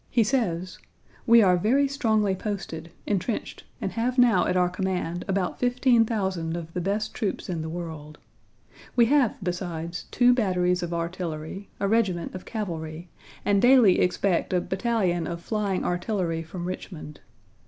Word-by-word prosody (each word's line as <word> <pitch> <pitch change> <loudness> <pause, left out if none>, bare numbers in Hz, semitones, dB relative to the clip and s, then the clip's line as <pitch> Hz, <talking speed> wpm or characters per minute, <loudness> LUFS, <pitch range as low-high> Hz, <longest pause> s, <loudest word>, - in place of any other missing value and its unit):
He 235 - +3
says: 185 -7 -1 0.5
"We 230 -1 +7
are 180 -2 +4
very 260 +10 +3
strongly 220 -8 +1
posted, 185 -5 -5 0.2
entrenched, 205 +2 -2
and - - -3
have 245 +3 -1
now 235 -8 +5
at 180 - +1
our 180 0 +4
command 180 -1 -2
about 195 -2 -1
15,000 225 -9 +1
of 165 -1 -8
the 180 - -2
best 205 +4 -1
troops 210 -5 -3
in 170 -3 -2
the 160 - -4
world. 160 -3 -7 0.8
We 235 - +6
have 265 -2 +3
besides, 175 -2 -4
two 245 0 +4
batteries 180 -6 +1
of 175 -1 -4
artillery, 170 +1 -4
a 200 - +1
regiment 195 -6 +1
of 185 - -8
cavalry, 170 -6 -5 0.4
and 200 -1 +3
daily 245 -7 +6
expect 180 0 +1
a 180 - +3
battalion 190 -5 0
of 170 -1 -4
flying 205 -4 -1
artillery 175 -2 -1
from 175 +2 -7
Richmond. 170 -4 -7
185 Hz, 150 wpm, -26 LUFS, 170-220 Hz, 0.8 s, We